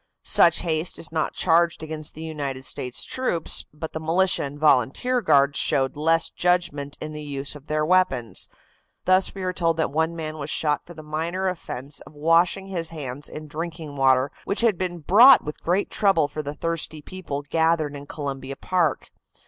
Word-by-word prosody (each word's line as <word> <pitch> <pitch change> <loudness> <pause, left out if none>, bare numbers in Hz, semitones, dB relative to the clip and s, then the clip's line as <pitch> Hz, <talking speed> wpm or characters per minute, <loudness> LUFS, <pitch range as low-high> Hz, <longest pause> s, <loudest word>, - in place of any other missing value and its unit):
Such 170 -1 +6
haste 160 0 0
is 160 - -4
not 160 -1 -1
charged 170 -1 +2
against 155 -1 -5
the 160 - -8
United 140 -4 -5
States 125 -3 -2
troops, 250 -11 -2
but 155 +2 -7
the 160 - -3
militia 175 +4 +1
and 140 +1 -5
volunteer 150 - +2
guards 140 -6 +3
showed 135 0 +1
less 165 +2 +2
judgment 175 -6 0
in 155 0 -6
the 150 - -7
use 140 -1 -4
of 145 0 -13
their 155 0 0
weapons. 165 -10 +1 0.6
Thus 185 +1 +3
we 190 - -5
are 185 0 -1
told 165 -2 0
that 160 - 0
one 160 +3 0
man 155 -1 -5
was 145 +1 -5
shot 150 -2 0
for 175 - -11
the 155 - -10
minor 165 +5 -2
offense 145 -6 -5
of - - -15
washing 165 +5 +2
his 170 -4 -3
hands 145 -3 -6
in 155 0 -8
drinking 160 -1 -6
water 135 0 +3
which 200 - -1
had 230 -4 +3
been 175 -1 -4
brought 235 - +7
with 150 - -7
great 180 +4 0
trouble 195 -8 +3
for 150 +1 -5
the 145 0 -6
thirsty 160 -2 -3
people 145 -6 -6
gathered 160 0 +1
in 145 0 -9
Columbia 135 -2 -5
Park. 175 -3 -1
155 Hz, 185 wpm, -24 LUFS, 145-175 Hz, 0.6 s, brought